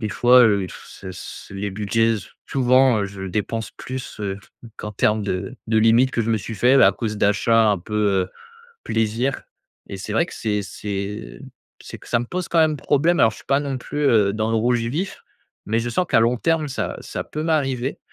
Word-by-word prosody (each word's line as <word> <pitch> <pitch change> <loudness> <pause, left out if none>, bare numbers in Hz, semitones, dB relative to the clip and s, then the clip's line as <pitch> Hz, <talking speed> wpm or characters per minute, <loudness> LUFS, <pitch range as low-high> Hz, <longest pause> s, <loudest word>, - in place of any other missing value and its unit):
des 110 - -2
fois, 125 +4 +6
heu, 100 -4 +3
s 90 - -13
s 95 -1 -8
les 100 +1 -3
budgets 110 +3 +1 0.3
souvent, 130 -2 +4
heu, - - 0
je 95 -1 -9
dépense 110 +3 -3
plus, 130 -4 -7
heu, 100 -1 -3 0.4
qu'en 105 - -6
termes 105 +2 +1
de 95 -1 -3
de 110 -1 +3
limites 115 +4 +4
que 115 - 0
je 115 - -1
me 110 - +2
suis 110 +4 -6
fait, 125 +6 +4
à - - +6
cause 105 -3 -4
d'achats 110 +2 +3
un 100 - +1
peu, 105 +5 -8 0.3
heu, - - -21 0.5
plaisir. 115 +4 -1 0.5
Et 100 - -6
c'est 100 +2 -6
vrai 115 - +2
que - - -10
c'est 105 -2 -1
c'est 100 - -6 0.4
c'est - - -9
que - - -16
ça 120 - +2
me 120 - -4
pose 180 +5 -4
quand 170 - +1
même 155 -1 +3
problème. 160 +6 +2
Alors 110 - +6
je - - -12
suis - - -16
pas 140 +1 +2
non 140 -2 -3
plus, 145 +3 -5
heu, 105 -7 +4
dans 110 +1 -1
le 115 - +1
rouge 120 +2 +2
vif, 145 +12 -3 0.4
mais 110 +2 +1
je 120 - -3
sens 180 +9 0
qu'à 115 - +4
long 120 +2 +3
terme, 165 0 +1
ça 130 - -3
ça - - -5
peut 155 - -5
m'arriver. 135 -5 0
115 Hz, 215 wpm, -22 LUFS, 105-130 Hz, 0.5 s, fois